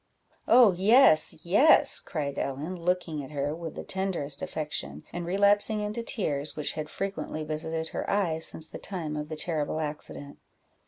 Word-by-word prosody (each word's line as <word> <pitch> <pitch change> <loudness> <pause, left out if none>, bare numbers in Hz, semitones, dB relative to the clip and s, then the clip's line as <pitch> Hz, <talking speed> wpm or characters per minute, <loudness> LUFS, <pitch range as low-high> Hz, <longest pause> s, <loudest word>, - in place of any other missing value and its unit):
"Oh 235 -3 +7
yes, 185 - +4
yes!" 210 - +5
cried 145 -5 -4
Ellen, 145 +7 -3
looking 170 -3 -2
at 135 - -9
her 145 0 -2
with 165 -2 -7
the - - -6
tenderest 175 -7 -2
affection, 150 - -5
and 175 -1 -4
relapsing 205 +3 +3
into 210 +3 -3
tears, 150 -11 -2
which 150 - -2
had 155 -1 -5
frequently 195 -5 -4
visited 160 +1 -4
her - - -4
eyes 170 -6 +1
since 160 - -3
the - - -9
time 165 -6 -4
of 150 0 -5
the 155 - -4
terrible 155 -1 -1
accident. 150 -2 -6
160 Hz, 160 wpm, -28 LUFS, 150-195 Hz, -, Oh